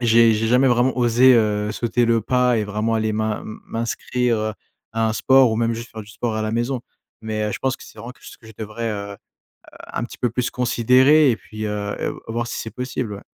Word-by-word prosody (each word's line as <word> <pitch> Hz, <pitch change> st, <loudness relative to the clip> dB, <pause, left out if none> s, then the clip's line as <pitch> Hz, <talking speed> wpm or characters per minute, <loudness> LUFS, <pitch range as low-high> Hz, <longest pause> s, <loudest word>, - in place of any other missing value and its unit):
j'ai 115 Hz, -1 st, +5 dB
jamais 125 Hz, +5 st, +3 dB
vraiment 125 Hz, +2 st, +2 dB
osé, 125 Hz, +1 st, +5 dB
heu, 105 Hz, -2 st, +1 dB
sauter 120 Hz, +2 st, 0 dB
le 115 Hz, -1 st, +2 dB
pas 125 Hz, +1 st, +2 dB
et 110 Hz, -, 0 dB
vraiment 105 Hz, +2 st, -1 dB
aller 110 Hz, -1 st, 0 dB
m'in 110 Hz, 0 st, -2 dB, 0.2 s
m'inscrire, 115 Hz, +1 st, -1 dB
heu, 110 Hz, 0 st, -2 dB, 0.4 s
à 115 Hz, 0 st, +1 dB
un 110 Hz, -, 0 dB
sport 130 Hz, +1 st, +4 dB
ou -, -, -1 dB
même 115 Hz, 0 st, 0 dB
juste 115 Hz, +1 st, -8 dB
faire 110 Hz, -, -8 dB
du 105 Hz, -, -16 dB
sport 110 Hz, +2 st, -3 dB
à 110 Hz, -, -2 dB
la 110 Hz, -, -2 dB
maison. 120 Hz, +3 st, -1 dB, 0.4 s
Mais 110 Hz, -1 st, -3 dB
heu, 105 Hz, -, -2 dB
je -, -, -4 dB
pense 130 Hz, -1 st, -1 dB
que -, -, -14 dB
c'est -, -, -15 dB
vraiment 120 Hz, +2 st, -8 dB
que -, -, -27 dB
je 110 Hz, -2 st, -13 dB
devrais, 110 Hz, +2 st, -4 dB
heu 100 Hz, -1 st, -5 dB
heu, -, -, -10 dB, 0.8 s
un -, -, -2 dB
petit -, -, -10 dB
peu 125 Hz, -, +1 dB
plus 125 Hz, +2 st, -1 dB
considérer 130 Hz, +4 st, +4 dB
et 115 Hz, -, 0 dB
puis, 110 Hz, -1 st, -8 dB
heu 105 Hz, -1 st, -3 dB
et -, -, -2 dB, 0.2 s
voir 120 Hz, +1 st, -2 dB
si -, -, -5 dB
c'est 110 Hz, -, -6 dB
possible, 125 Hz, -4 st, -4 dB
ouais. 100 Hz, -, -10 dB
115 Hz, 235 wpm, -21 LUFS, 110-125 Hz, 0.8 s, j'ai